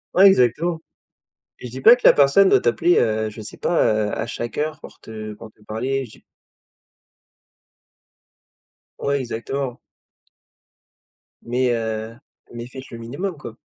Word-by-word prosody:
Ouais 190 Hz, -, +7 dB
exactement 160 Hz, -, +2 dB, 0.8 s
et -, -, -8 dB
je 120 Hz, -, -9 dB
dis 130 Hz, -, -7 dB
pas 235 Hz, -, +9 dB
que -, -, 0 dB
la -, -, +9 dB
personne 145 Hz, +8 st, +5 dB
doit -, -, +4 dB
t'appeler, 120 Hz, +9 st, +2 dB
heu, 110 Hz, -1 st, +1 dB
je 105 Hz, -, -11 dB
sais 105 Hz, -, -9 dB
pas, 175 Hz, -, +1 dB
heu, 105 Hz, -1 st, +1 dB
à 110 Hz, -, -3 dB
chaque 120 Hz, 0 st, -6 dB
heure 155 Hz, +1 st, -2 dB
pour -, -, -13 dB
te 110 Hz, -1 st, -8 dB
pour 110 Hz, +1 st, -12 dB
te 105 Hz, -, -32 dB
parler 130 Hz, +5 st, -3 dB
j'ai 110 Hz, -, -18 dB, 2.8 s
Ouais 140 Hz, 0 st, 0 dB
exactement. 125 Hz, +2 st, -4 dB, 1.6 s
Mais, 125 Hz, +1 st, 0 dB
heu, 110 Hz, 0 st, -4 dB, 0.4 s
mais 120 Hz, 0 st, -7 dB
faites 130 Hz, +1 st, -11 dB
le 115 Hz, -, -7 dB
minimum 145 Hz, +11 st, -5 dB
quoi. 120 Hz, -6 st, -9 dB
120 Hz, 150 wpm, -21 LUFS, 110-140 Hz, 2.8 s, pas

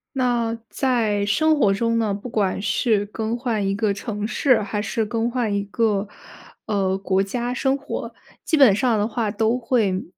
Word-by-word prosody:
那 235 Hz, -3 st, 0 dB
在 225 Hz, -6 st, 0 dB
生 310 Hz, +10 st, +2 dB
活 205 Hz, -8 st, +4 dB
中 230 Hz, +3 st, 0 dB
呢， 220 Hz, -3 st, 0 dB
不 200 Hz, +5 st, -6 dB
管 200 Hz, -5 st, 0 dB
是 205 Hz, +1 st, +1 dB
更 220 Hz, +2 st, -3 dB
换 230 Hz, -5 st, -1 dB
一 195 Hz, -, 0 dB
个 205 Hz, -1 st, 0 dB
城 210 Hz, 0 st, -4 dB
市， 255 Hz, 0 st, +3 dB
还 205 Hz, 0 st, -3 dB
是 220 Hz, +1 st, -1 dB
更 230 Hz, +1 st, -1 dB
换 235 Hz, -4 st, -1 dB
一 200 Hz, -, 0 dB
个， 205 Hz, 0 st, 0 dB, 0.6 s
呃， 190 Hz, -2 st, 0 dB
国 195 Hz, 0 st, +1 dB
家 240 Hz, +5 st, -3 dB
生 270 Hz, +1 st, 0 dB
活， 280 Hz, +1 st, -6 dB, 0.3 s
基 315 Hz, -, +1 dB
本 260 Hz, -8 st, +7 dB
上 235 Hz, -2 st, +2 dB
的 210 Hz, +1 st, 0 dB
话 225 Hz, -2 st, -1 dB
都 220 Hz, +3 st, +1 dB
会， 225 Hz, -6 st, 0 dB
220 Hz, 195 characters per minute, -22 LUFS, 200-240 Hz, 0.6 s, 本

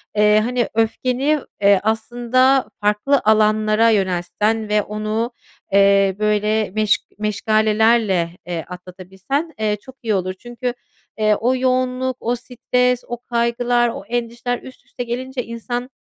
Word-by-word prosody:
eee, 210 Hz, 0 st, +5 dB
hani, 245 Hz, 0 st, 0 dB
öfkeni, 255 Hz, +6 st, +1 dB, 0.2 s
eee, 200 Hz, -1 st, +5 dB
aslında 240 Hz, +4 st, +2 dB
farklı 210 Hz, +7 st, +2 dB
alanlara 215 Hz, +1 st, +3 dB
yöneltsen 205 Hz, +2 st, 0 dB
ve 210 Hz, 0 st, +3 dB
onu, 215 Hz, +3 st, -3 dB, 0.4 s
eee, 195 Hz, -1 st, +4 dB
böyle, 210 Hz, 0 st, +1 dB
meş 215 Hz, -1 st, +3 dB, 0.2 s
meşgalelerle, 215 Hz, -2 st, +2 dB, 0.2 s
eee, 170 Hz, -3 st, -4 dB
atlatabilsen, 190 Hz, -, -5 dB
eee, 215 Hz, -1 st, +1 dB
çok 260 Hz, -1 st, -14 dB
iyi 220 Hz, -, 0 dB
olur. 185 Hz, -1 st, -1 dB
Çünkü, 240 Hz, +1 st, -4 dB, 0.4 s
eee, 215 Hz, -1 st, +3 dB
o 245 Hz, +5 st, +1 dB
yoğunluk, 255 Hz, 0 st, 0 dB
o 240 Hz, +2 st, -1 dB
stres, 250 Hz, 0 st, 0 dB
o 240 Hz, -, -4 dB
kaygılar, 240 Hz, 0 st, +1 dB
o 230 Hz, -, -6 dB
endişeler 240 Hz, +1 st, -3 dB
üst 260 Hz, -, -13 dB
üste 245 Hz, -, -6 dB
gelince 250 Hz, +2 st, -4 dB
insan 240 Hz, +2 st, -5 dB
225 Hz, 125 wpm, -20 LUFS, 210-245 Hz, 0.4 s, eee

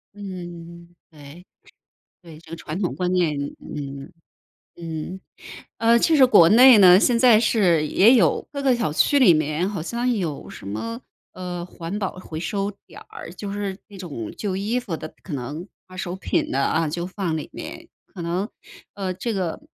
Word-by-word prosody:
嗯， 175 Hz, -3 st, -9 dB, 0.2 s
对， 150 Hz, +3 st, -14 dB, 0.8 s
对， 165 Hz, -3 st, -13 dB
这 -, -, -18 dB
个 165 Hz, -, -6 dB
传 165 Hz, 0 st, -6 dB
统 185 Hz, -, -1 dB
观 180 Hz, -1 st, -1 dB
念， 170 Hz, -5 st, +1 dB, 0.2 s
嗯， 140 Hz, +1 st, -7 dB, 0.6 s
嗯。 165 Hz, +2 st, -6 dB, 0.6 s
呃， 230 Hz, +1 st, +4 dB
其 320 Hz, +7 st, +3 dB
实 265 Hz, -3 st, +7 dB
国 200 Hz, -9 st, +7 dB
内 250 Hz, +3 st, +8 dB
呢， 185 Hz, -1 st, +8 dB
现 240 Hz, +1 st, +3 dB
在 230 Hz, -3 st, +6 dB
是 185 Hz, -9 st, +2 dB
也 215 Hz, -, +5 dB
有 180 Hz, -, +2 dB
各 280 Hz, -1 st, -4 dB
个 265 Hz, -3 st, +3 dB
小 220 Hz, -11 st, -1 dB
区 285 Hz, -, +3 dB
里 250 Hz, -10 st, +7 dB
面 155 Hz, +3 st, 0 dB
好 200 Hz, -4 st, -4 dB
像 235 Hz, +9 st, -2 dB
有 170 Hz, -10 st, -4 dB
什 -, -, -11 dB
么， 230 Hz, -, -5 dB, 0.3 s
呃， 180 Hz, -1 st, -6 dB
环 175 Hz, +2 st, -6 dB
保 190 Hz, -2 st, -4 dB
回 160 Hz, -4 st, -7 dB
收 200 Hz, +4 st, -2 dB, 0.2 s
点 -, -, -13 dB
儿， 165 Hz, -, -10 dB
就 200 Hz, +2 st, -7 dB
是 200 Hz, -1 st, -4 dB
那 205 Hz, -, -13 dB
种 145 Hz, -, -6 dB
旧 200 Hz, -3 st, -3 dB
衣 210 Hz, +6 st, -1 dB
服 225 Hz, -9 st, -5 dB
的， 155 Hz, -, -7 dB
可 185 Hz, -, -9 dB
能 145 Hz, +6 st, -5 dB, 0.2 s
二 185 Hz, -, -13 dB
手 180 Hz, -1 st, -4 dB
品 190 Hz, -, -1 dB
的 135 Hz, -, 0 dB
啊， 160 Hz, +3 st, +1 dB
就 170 Hz, +3 st, -3 dB
放 185 Hz, -3 st, -3 dB
里 155 Hz, -, -7 dB
面， 330 Hz, +1 st, -8 dB, 0.3 s
可 185 Hz, -, -8 dB
能， 175 Hz, +4 st, -2 dB, 0.5 s
呃， 190 Hz, -2 st, -3 dB
这 210 Hz, +6 st, -3 dB
个 185 Hz, -5 st, -3 dB
185 Hz, 195 characters per minute, -23 LUFS, 165-210 Hz, 0.8 s, 内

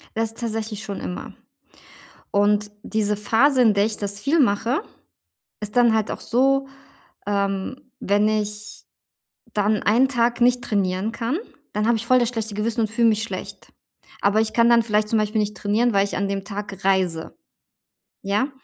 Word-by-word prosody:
Das 225 Hz, 0 st, 0 dB
ist -, -, -17 dB
tatsächlich 220 Hz, -2 st, -4 dB
schon 200 Hz, -1 st, -5 dB
immer, 180 Hz, -, -6 dB, 1.0 s
und 205 Hz, +1 st, +2 dB
diese 210 Hz, -2 st, -1 dB
Phase, 255 Hz, +6 st, +3 dB
in 220 Hz, -4 st, +5 dB
der 200 Hz, +1 st, +2 dB
ich 220 Hz, -1 st, -3 dB
das 200 Hz, 0 st, -2 dB
viel 305 Hz, +7 st, +1 dB
mache, 240 Hz, -, +2 dB, 0.8 s
ist 210 Hz, +3 st, -7 dB
dann 240 Hz, -2 st, +5 dB
halt 220 Hz, -1 st, 0 dB
auch -, -, -5 dB
so, 270 Hz, +3 st, +2 dB, 0.6 s
ähm, 200 Hz, +6 st, -2 dB
wenn 205 Hz, +2 st, +2 dB
ich 210 Hz, 0 st, -3 dB, 0.7 s
dann 210 Hz, 0 st, +1 dB
einen 240 Hz, +6 st, +4 dB
Tag 240 Hz, -2 st, 0 dB
nicht 245 Hz, 0 st, +3 dB
trainieren 195 Hz, +1 st, -1 dB
kann, 235 Hz, +5 st, -2 dB, 0.4 s
dann 210 Hz, +1 st, -1 dB
habe 235 Hz, 0 st, +3 dB
ich 225 Hz, -, -4 dB
voll 255 Hz, +1 st, +5 dB
das 240 Hz, -, +2 dB
schlechte 220 Hz, -3 st, -4 dB
Gewissen 225 Hz, +2 st, -1 dB
und 220 Hz, -1 st, 0 dB
fühle 230 Hz, 0 st, +3 dB
mich 215 Hz, -1 st, +1 dB
schlecht. 230 Hz, -, -7 dB, 0.5 s
Aber 205 Hz, +2 st, +3 dB
ich 220 Hz, 0 st, -1 dB
kann 235 Hz, +1 st, +4 dB
dann 235 Hz, -1 st, +5 dB
vielleicht 210 Hz, -1 st, 0 dB
zum 220 Hz, 0 st, +2 dB
Beispiel 215 Hz, +1 st, -1 dB
nicht 210 Hz, 0 st, -2 dB
trainieren, 220 Hz, +4 st, +1 dB
weil 200 Hz, 0 st, +3 dB
ich 200 Hz, -, -4 dB
an 200 Hz, -, 0 dB
dem 195 Hz, 0 st, -3 dB
Tag 200 Hz, -2 st, -7 dB
reise. 185 Hz, -4 st, 0 dB, 0.9 s
Ja, 205 Hz, +8 st, 0 dB
215 Hz, 175 wpm, -22 LUFS, 205-235 Hz, 1.0 s, in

